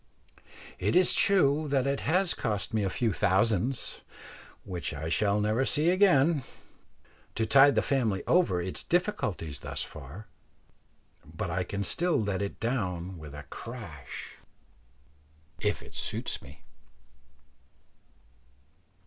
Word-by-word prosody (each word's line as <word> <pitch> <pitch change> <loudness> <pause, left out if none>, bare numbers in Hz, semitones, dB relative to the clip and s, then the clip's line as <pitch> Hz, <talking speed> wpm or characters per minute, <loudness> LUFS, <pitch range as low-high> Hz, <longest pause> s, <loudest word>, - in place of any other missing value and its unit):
It - - 0
is 180 0 +5
true 155 -6 +3
it 140 0 +1
has 180 +3 +1
cost 105 -6 -2
me 110 - +1
a 95 - 0
few 110 +2 0
thousands, 105 +5 +1 0.6
which 85 -8 -4
I 80 +3 -4
shall 100 +4 +2
never 110 +5 +1
see 155 +5 +3
again, 170 -6 +4 0.9
to 110 - +1
tide 140 +5 +6
the - - +2
family 115 -8 0
over 170 - +3
its 90 +1 -3
difficulties 175 - -1
thus - - -4
far, 75 +11 -10 1.0
but 80 +3 -5
I 90 +2 0
can 100 +2 -3
still 175 - +1
let 100 -3 -1
it 100 - -4
down 95 -7 -2
with 75 -2 -9
a 75 - -8
crash - - -8 1.2
if 105 +3 -1
it - - -14
suits - - -3
me. 70 +3 -14
105 Hz, 125 wpm, -29 LUFS, 90-140 Hz, 1.2 s, tide